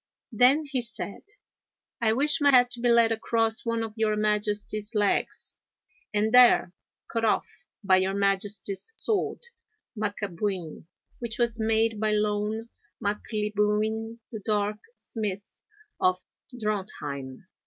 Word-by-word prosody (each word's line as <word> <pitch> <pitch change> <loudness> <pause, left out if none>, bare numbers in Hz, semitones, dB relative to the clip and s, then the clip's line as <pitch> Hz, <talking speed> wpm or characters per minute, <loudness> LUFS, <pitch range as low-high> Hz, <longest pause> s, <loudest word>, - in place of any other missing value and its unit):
Then 255 +7 +4
he 270 -3 -1
said: 230 -3 -5 0.8
'I 220 -1 +3
wish 295 +5 +2
my 285 - +5
head 250 -2 +5
to 240 - -6
be 240 0 +1
laid 235 -1 +5
across 225 0 0
one 230 -1 -1
of 220 -1 -6
your 220 -2 +1
Majesty's 210 0 -1
legs, 205 -1 0 0.5
and 215 +2 0
there 245 -7 +6 0.3
cut 230 -1 -2
off 220 - +2 0.4
by 190 -2 +5
your 190 +1 0
Majesty's 200 - -1
sword 440 +2 -1 0.5
Macabuin, 200 -5 -3 0.3
which 235 -2 -4
was 235 -1 0
made 220 0 +1
by 215 0 +1
Loan 210 +2 -1 0.3
Maclibuin, 210 +1 -1
the 220 - -5
Dark 210 0 -1 0.2
Smith 205 -3 -6 0.4
of 185 0 +2 0.4
Drontheim!' 185 - -4
215 Hz, 120 wpm, -27 LUFS, 205-230 Hz, 0.8 s, there